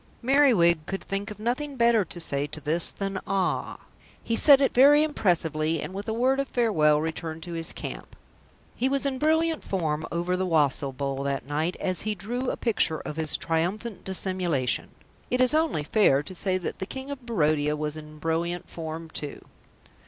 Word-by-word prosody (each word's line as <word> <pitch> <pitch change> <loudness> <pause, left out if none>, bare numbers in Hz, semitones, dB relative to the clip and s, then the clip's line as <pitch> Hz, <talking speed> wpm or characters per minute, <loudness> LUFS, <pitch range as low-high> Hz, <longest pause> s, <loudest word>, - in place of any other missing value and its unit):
Merriwig 235 - +4
could 195 - -4
think 200 +2 -3
of 210 - -8
nothing 255 +6 -2
better 235 -3 +4
to 175 0 -8
say 145 -3 0
to 150 +2 -4
this 160 +3 +3
than 195 -1 -4
"Ah!" 195 -2 -1 0.4
He 230 - -1
said 280 +3 +7
it 275 - +2
very 290 +4 +7
impressively, 165 - 0
and 150 +5 -6
with 200 +3 -6
a - - -1
word 260 +4 +2
of 275 - -1
farewell 155 -13 +3
returned 160 0 -4
to 175 - -7
his 165 0 -1
camp. - - -8 0.6
He 260 - 0
was 275 +1 0
in 265 -2 -1
brilliant 320 +1 +1
form 155 -5 -2
over 175 +2 -1
the 185 0 -1
wassail 145 -4 +1
bowl 135 0 -3
that 140 -1 -2
night 155 +5 -2
as 185 -2 0
he 215 0 -2
drew 240 +7 -3
a - - -3
picture 205 -9 +1
of 150 - -6
his 160 -1 +1
triumphant 185 +7 -2
dissimulation. 185 -8 -1 0.4
It 250 - 0
is 255 +1 +4
only 310 - +1
fair 145 -6 +3
to 185 - -9
say 185 +1 -1
that 180 - -5
the 190 - -4
King 265 +1 -6
of 275 -3 -7
Barodia 150 -9 +1
was 150 0 -3
in 155 0 -10
brilliant 165 +3 -2
form 160 0 -6
too. 150 -2 -6
180 Hz, 190 wpm, -26 LUFS, 155-235 Hz, 0.6 s, said